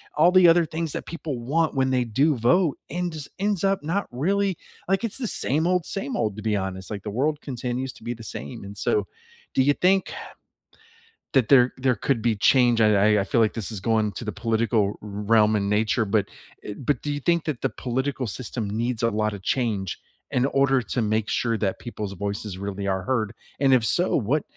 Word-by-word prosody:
all 170 Hz, +4 st, +5 dB
the 185 Hz, -2 st, +7 dB
other 170 Hz, 0 st, +5 dB
things 160 Hz, -1 st, -4 dB
that -, -, -5 dB
people 155 Hz, -6 st, -5 dB
want 155 Hz, +6 st, 0 dB
when 130 Hz, -1 st, +2 dB
they 125 Hz, -1 st, +2 dB
do 140 Hz, +7 st, +2 dB
vote 140 Hz, +7 st, +3 dB
ends 170 Hz, -4 st, -4 dB
ends 200 Hz, -1 st, -1 dB
up 195 Hz, -5 st, +1 dB
not 185 Hz, +6 st, -1 dB
really, 190 Hz, +7 st, 0 dB, 0.3 s
like, 195 Hz, +3 st, +1 dB
it's 230 Hz, -, -3 dB
the 245 Hz, -4 st, -3 dB
same 155 Hz, +1 st, 0 dB
old 180 Hz, -2 st, +1 dB
same 170 Hz, -9 st, -4 dB
old, 110 Hz, -3 st, -1 dB
to -, -, -5 dB
be 110 Hz, -1 st, 0 dB
honest, 95 Hz, -1 st, -4 dB
like, 100 Hz, -3 st, -5 dB
the 105 Hz, -, -4 dB
world 145 Hz, +6 st, 0 dB
continues 125 Hz, 0 st, -3 dB
to -, -, -17 dB
be 120 Hz, -, -2 dB
the 115 Hz, -1 st, -11 dB
same. 70 Hz, -4 st, -7 dB
And 100 Hz, 0 st, -9 dB
so, 105 Hz, -1 st, +1 dB, 0.5 s
do 130 Hz, -, +3 dB
you 145 Hz, +2 st, +4 dB
think, 190 Hz, +4 st, +2 dB
uh, -, -, -9 dB, 1.0 s
that 130 Hz, -5 st, +4 dB
there 125 Hz, -3 st, +6 dB
there 130 Hz, -2 st, +2 dB
could 115 Hz, +2 st, 0 dB
be 115 Hz, -1 st, +1 dB
change? 120 Hz, +2 st, +4 dB
I 105 Hz, -1 st, +4 dB
I -, -, +3 dB
I -, -, 0 dB
feel 115 Hz, +4 st, +1 dB
like 110 Hz, -, +2 dB
this 115 Hz, -1 st, -4 dB
is 105 Hz, -, -5 dB
going 110 Hz, 0 st, +1 dB
to -, -, -5 dB
the 105 Hz, -, -2 dB
political 115 Hz, 0 st, +1 dB, 0.2 s
r 105 Hz, -, -9 dB
realm 105 Hz, +1 st, +3 dB
in 100 Hz, -1 st, 0 dB
nature, 110 Hz, +2 st, +1 dB
but 100 Hz, 0 st, +1 dB, 0.4 s
y 105 Hz, -, -6 dB
but 140 Hz, +2 st, -1 dB
do 145 Hz, -, -3 dB
you 145 Hz, -, -2 dB
think 170 Hz, +1 st, +1 dB
that 150 Hz, -6 st, -3 dB
the -, -, +2 dB
political 130 Hz, 0 st, -2 dB
system 110 Hz, -1 st, -5 dB
needs 115 Hz, +3 st, -2 dB
a 115 Hz, -, +4 dB
lotta 105 Hz, -1 st, -1 dB
change 100 Hz, -4 st, -1 dB, 0.3 s
in 125 Hz, +1 st, +2 dB
order 135 Hz, -1 st, +2 dB
to 120 Hz, +2 st, -2 dB
make 110 Hz, 0 st, 0 dB
sure 115 Hz, -2 st, 0 dB
that 100 Hz, -3 st, -1 dB
people's 105 Hz, -5 st, -6 dB
voices 100 Hz, 0 st, -4 dB
really 100 Hz, 0 st, -4 dB
are 95 Hz, -1 st, -1 dB
heard? 110 Hz, 0 st, -1 dB, 0.3 s
And 135 Hz, -2 st, +4 dB
if 125 Hz, -3 st, +4 dB
so, 175 Hz, +10 st, +1 dB
what 140 Hz, +5 st, +1 dB
120 Hz, 220 wpm, -24 LUFS, 105-145 Hz, 1.0 s, the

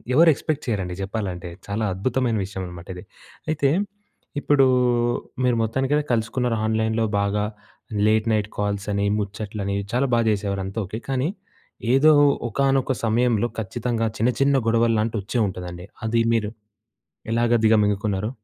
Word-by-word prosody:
ఎవరు 165 Hz, +3 st, +7 dB
ఎక్స్‌పెక్ట్ 150 Hz, +1 st, -3 dB
చేయరండి 95 Hz, -6 st, -2 dB
జెప్పాలంటే. 95 Hz, -4 st, -4 dB, 0.2 s
చాలా 100 Hz, +2 st, -2 dB
అద్భుతమైన 115 Hz, +3 st, 0 dB
విషయం 95 Hz, 0 st, -6 dB
అనమాట 90 Hz, -1 st, -10 dB
ఇది. 90 Hz, -, -9 dB, 0.5 s
అయితే 145 Hz, -3 st, +2 dB, 0.7 s
ఇప్పుడు 140 Hz, -2 st, +4 dB, 0.8 s
మీరు 125 Hz, -1 st, +3 dB
మొత్తానికి 130 Hz, +5 st, 0 dB, 0.2 s
కలుసుకున్నారు 115 Hz, +1 st, 0 dB
ఆన్‍లైన్‍లో 110 Hz, 0 st, +1 dB
బాగా 100 Hz, +1 st, 0 dB, 0.6 s
లేట్ 110 Hz, +1 st, +2 dB
నైట్ 105 Hz, 0 st, 0 dB
కాల్స్ 100 Hz, -1 st, -1 dB
అని, 100 Hz, 0 st, 0 dB
ముచ్చట్లని 100 Hz, 0 st, -3 dB, 0.2 s
చాలా 125 Hz, +3 st, +2 dB
బాగా 115 Hz, -1 st, +3 dB
జేసేవారు 100 Hz, -2 st, -1 dB
అంతా 95 Hz, +4 st, -4 dB
ఓకే. 110 Hz, +5 st, -6 dB
కానీ 135 Hz, +3 st, 0 dB, 0.6 s
ఏదో 150 Hz, +4 st, +6 dB, 0.4 s
ఒకానొక 135 Hz, +2 st, +1 dB
సమయంలో 120 Hz, 0 st, +2 dB
ఖచ్చితంగా 115 Hz, +2 st, -2 dB
చిన్న, 115 Hz, +3 st, +2 dB
చిన్న 140 Hz, 0 st, +4 dB
గొడవలు 115 Hz, 0 st, +3 dB
లాంటివి 110 Hz, 0 st, -1 dB
వచ్చే 120 Hz, -, -2 dB
ఉంటదండి. 90 Hz, -1 st, -7 dB, 0.2 s
అది 115 Hz, +1 st, +1 dB
మీరు 110 Hz, -2 st, +1 dB, 0.8 s
ఎలాగా 120 Hz, +1 st, +2 dB
దిగమింగుకున్నారు? 105 Hz, -1 st, +2 dB
110 Hz, 135 wpm, -23 LUFS, 100-120 Hz, 0.8 s, ఎవరు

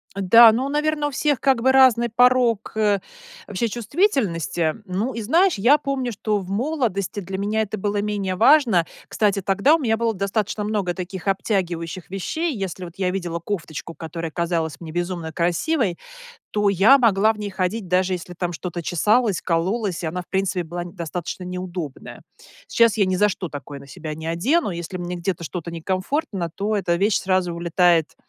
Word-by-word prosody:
да, 220 Hz, +4 st, +7 dB
ну, 250 Hz, +5 st, -1 dB
наверно 300 Hz, 0 st, 0 dB
у -, -, -5 dB
всех 290 Hz, 0 st, 0 dB
как 265 Hz, -4 st, +2 dB
бы 260 Hz, +2 st, +4 dB
разный 255 Hz, -3 st, +5 dB
порог 245 Hz, -2 st, +3 dB, 0.8 s
вообще 205 Hz, +4 st, -1 dB
чувствительности. 215 Hz, -, 0 dB
Ну, 200 Hz, +7 st, -2 dB
и 230 Hz, -, -4 dB
знаешь, 335 Hz, -, +3 dB
я 240 Hz, +9 st, +5 dB
помню, 275 Hz, -4 st, -2 dB
что 215 Hz, -1 st, -1 dB
в 185 Hz, -2 st, -9 dB
молодости 215 Hz, -, -1 dB
для 190 Hz, 0 st, -5 dB
меня 210 Hz, +3 st, 0 dB
это 215 Hz, 0 st, -3 dB
было 205 Hz, +1 st, -1 dB
менее 205 Hz, -3 st, -2 dB
важно. 225 Hz, -, +5 dB, 0.2 s
Кстати, 205 Hz, -2 st, +1 dB
тогда 200 Hz, -, +3 dB
у -, -, +2 dB
меня 225 Hz, -6 st, +1 dB
было 230 Hz, 0 st, 0 dB
достаточно 200 Hz, +2 st, -2 dB
много 205 Hz, -4 st, -1 dB
таких 185 Hz, +1 st, -6 dB
обтягивающих 185 Hz, -3 st, -2 dB
вещей. 295 Hz, -, -2 dB
Если 190 Hz, -3 st, -5 dB
вот 170 Hz, -, -10 dB
я 185 Hz, -2 st, 0 dB
видела 175 Hz, -3 st, -3 dB
кофточку, 165 Hz, -3 st, -5 dB
которая 165 Hz, 0 st, -6 dB
казалась 165 Hz, -3 st, -2 dB
мне 165 Hz, -2 st, -8 dB
безумно 175 Hz, -1 st, -3 dB
красивой, 180 Hz, -, 0 dB, 0.6 s
то 210 Hz, -1 st, +2 dB
я 200 Hz, +8 st, +6 dB
могла 220 Hz, -3 st, +4 dB
в 215 Hz, -, -14 dB
ней 205 Hz, -1 st, -4 dB
ходить 190 Hz, +2 st, -2 dB
даже 185 Hz, +1 st, +2 dB
если 180 Hz, 0 st, -5 dB
там 175 Hz, 0 st, -3 dB
что-то 175 Hz, +1 st, -5 dB
чесалось, 210 Hz, +5 st, +2 dB
кололось 185 Hz, +3 st, -1 dB
и -, -, -1 dB
она 180 Hz, +3 st, -3 dB
в -, -, -25 dB
принципе 190 Hz, -1 st, -1 dB
была 175 Hz, +2 st, -5 dB
н 175 Hz, -, -10 dB
достаточно 175 Hz, 0 st, -5 dB
неудобная. 180 Hz, -5 st, -6 dB, 0.5 s
Сейчас 230 Hz, -2 st, +3 dB
я 200 Hz, -3 st, +3 dB
ни 185 Hz, 0 st, 0 dB
за 210 Hz, +3 st, +4 dB
что 190 Hz, -3 st, -4 dB
такое 145 Hz, -1 st, -8 dB
на 140 Hz, -, -13 dB
себя 155 Hz, +3 st, -6 dB
не 160 Hz, +1 st, -8 dB
одену. 225 Hz, -, +1 dB
Если 175 Hz, +1 st, -5 dB
мне 175 Hz, 0 st, -4 dB
где-то, 175 Hz, 0 st, -3 dB
что-то 170 Hz, +1 st, -5 dB
некомфортно, 185 Hz, -, -2 dB
то 210 Hz, +2 st, -1 dB
эта 180 Hz, -4 st, 0 dB
вещь 200 Hz, +3 st, +2 dB
сразу 185 Hz, -2 st, 0 dB
улетает, 170 Hz, -1 st, +2 dB
195 Hz, 180 wpm, -22 LUFS, 175-225 Hz, 0.8 s, да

